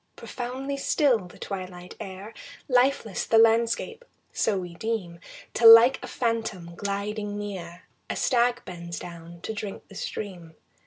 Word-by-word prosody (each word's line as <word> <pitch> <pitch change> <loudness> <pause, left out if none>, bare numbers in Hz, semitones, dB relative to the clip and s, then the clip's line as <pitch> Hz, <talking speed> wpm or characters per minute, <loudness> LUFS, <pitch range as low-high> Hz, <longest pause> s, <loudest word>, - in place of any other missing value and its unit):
Profoundly 260 +3 -5
still 260 - +2
the - - -15
twilight 180 -2 -7
air, 195 +3 -8 0.3
Lifeless 250 -5 +2
the 225 - +3
landscape; 230 - +3 0.3
so 210 -3 +1
we 180 -2 -5
deem 180 -3 -3 0.3
Till 225 0 +9
like 230 +3 +8
a - - -5
phantom 225 -8 -2
gliding 205 +2 -3
near 180 -4 -6 0.3
A - - -2
stag 245 -1 +2
bends 170 -2 -7
down 170 0 -9
to 220 - -4
drink 205 -2 -6
the - - -13
stream. 180 -5 -6
205 Hz, 140 wpm, -26 LUFS, 180-230 Hz, 0.3 s, Till